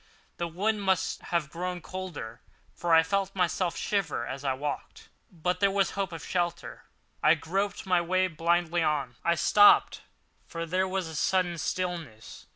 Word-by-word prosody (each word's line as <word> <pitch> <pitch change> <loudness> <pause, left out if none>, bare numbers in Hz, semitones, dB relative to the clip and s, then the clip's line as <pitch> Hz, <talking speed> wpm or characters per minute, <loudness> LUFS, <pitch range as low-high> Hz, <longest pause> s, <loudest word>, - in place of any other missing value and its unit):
The 170 - -2
wind 205 +6 -1
must 190 -2 0
have 165 -4 -1
grown 180 +1 -4
colder, 170 -11 -7 0.3
for 175 -1 -3
I 160 0 +7
felt 195 +3 -1
myself 175 -1 0
shiver 190 - -1
as 135 +2 -6
I 135 -2 +1
walked; 145 +1 -6 0.2
but 180 +1 -2
there 200 - +4
was 195 -2 +1
hope 195 -2 -3
of 165 -2 -7
shelter, 175 -2 -3 0.4
and - - +5
I - - +1
groped 200 +5 -2
my 180 -2 +3
way 185 +2 +1
blindly 170 +1 +1
on. 145 -6 -1
I 170 - +2
stopped, 205 +5 +5 0.5
for 165 0 -5
there 185 +3 0
was 190 -2 -2
a 160 - -8
sudden 175 +1 +1
stillness. 165 -9 -4
175 Hz, 165 wpm, -28 LUFS, 160-185 Hz, 0.5 s, I